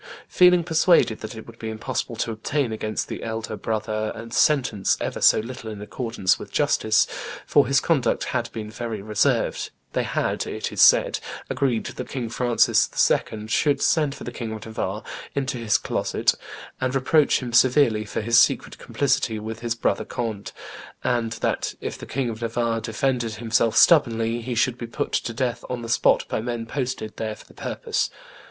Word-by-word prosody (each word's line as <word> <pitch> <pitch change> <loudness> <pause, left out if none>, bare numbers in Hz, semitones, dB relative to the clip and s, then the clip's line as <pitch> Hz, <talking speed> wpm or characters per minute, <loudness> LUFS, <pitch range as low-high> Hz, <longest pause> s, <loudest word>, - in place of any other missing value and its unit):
Feeling 180 -1 +5
persuaded 160 -8 +3
that 110 +2 -7
it 110 - -9
would 115 0 -14
be 110 - -4
impossible 115 +2 -3
to 115 +1 -2
obtain 120 +3 -1
against 110 -1 -3
the - - -6
elder 110 -1 -4
brother 110 0 -2
a 115 +1 -9
sentence 125 - +2
ever - - -4
so - - +6
little 115 -1 -7
in 105 -2 -7
accordance 115 -2 -1
with - - -9
justice, 110 -1 +3 0.4
for 145 - +4
his 135 0 +4
conduct 140 -7 +1
had 120 -2 -2
been 105 -1 -6
very 110 -2 -5
reserved, 105 -1 +1 0.2
they - - +1
had, - - -1
it - - -4
is - - 0
said, - - +6 0.3
agreed 125 -5 0
that - - -6
King 125 -4 -4
Francis 120 0 +3 0.2
II. 105 -1 -1
should 145 +6 +2
send 150 -4 +2
for - - -10
the - - -5
King 115 -3 -5
of 110 - -8
Navarre 110 -1 -4 0.3
into 135 -3 -2
his 110 -3 +2
closet - - 0 0.5
and 130 0 -1
reproach 145 +3 +3
him 120 -2 -6
severely 120 -3 +4
for 105 - -4
his 115 +2 +4
secret - - +2
complicity 130 -5 0
with 110 +1 -6
his 115 -1 -2
brother 115 - 0
Conde, 110 -4 -4 0.5
and 115 -2 0
that 115 - -2
if - - -4
the - - -10
King 135 -1 -2
of 110 +1 -8
Navarre 115 0 -1
defended 120 0 -1
himself 115 0 +1
stubbornly, 115 -7 +4
he 120 +1 -4
should 120 +1 +1
be 120 - -5
put 115 - -3
to 115 - -1
death 120 0 -2
on 125 -1 -4
the - - -5
spot 115 - +3
by - - -2
men 120 0 -3
posted 125 -3 -4
there 110 -1 -3
for - - -16
the - - -19
purpose. - - -2
115 Hz, 185 wpm, -24 LUFS, 110-130 Hz, 0.5 s, so